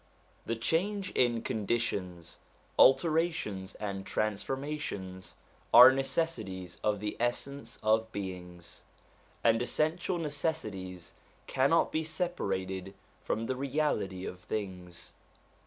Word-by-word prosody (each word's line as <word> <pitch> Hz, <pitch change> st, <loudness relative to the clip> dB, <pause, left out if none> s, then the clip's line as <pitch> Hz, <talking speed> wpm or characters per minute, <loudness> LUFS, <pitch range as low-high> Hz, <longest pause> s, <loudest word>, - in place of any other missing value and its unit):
The 115 Hz, -, 0 dB
change 185 Hz, -, 0 dB
in 120 Hz, -2 st, +2 dB
conditions, 100 Hz, -6 st, -2 dB, 0.4 s
alterations, 155 Hz, -, +3 dB
and 100 Hz, -2 st, -4 dB
transformations, 110 Hz, -4 st, -3 dB, 0.4 s
are 125 Hz, +2 st, +11 dB
necessities 115 Hz, -, -2 dB
of 105 Hz, -1 st, +1 dB
the 105 Hz, +1 st, -3 dB
essence 120 Hz, +1 st, -2 dB
of 110 Hz, +1 st, +2 dB
beings; 90 Hz, -4 st, -7 dB, 0.6 s
and 115 Hz, 0 st, +4 dB
essential 160 Hz, +8 st, 0 dB
necessities 110 Hz, -, -3 dB, 0.3 s
cannot 140 Hz, +5 st, +3 dB
be 160 Hz, -, 0 dB
separated 95 Hz, -, -2 dB, 0.3 s
from 110 Hz, +1 st, -2 dB
the 130 Hz, -, -1 dB
reality 130 Hz, -9 st, -1 dB
of 90 Hz, -, -6 dB
things. 90 Hz, -4 st, -6 dB
110 Hz, 95 wpm, -31 LUFS, 95-145 Hz, 0.6 s, are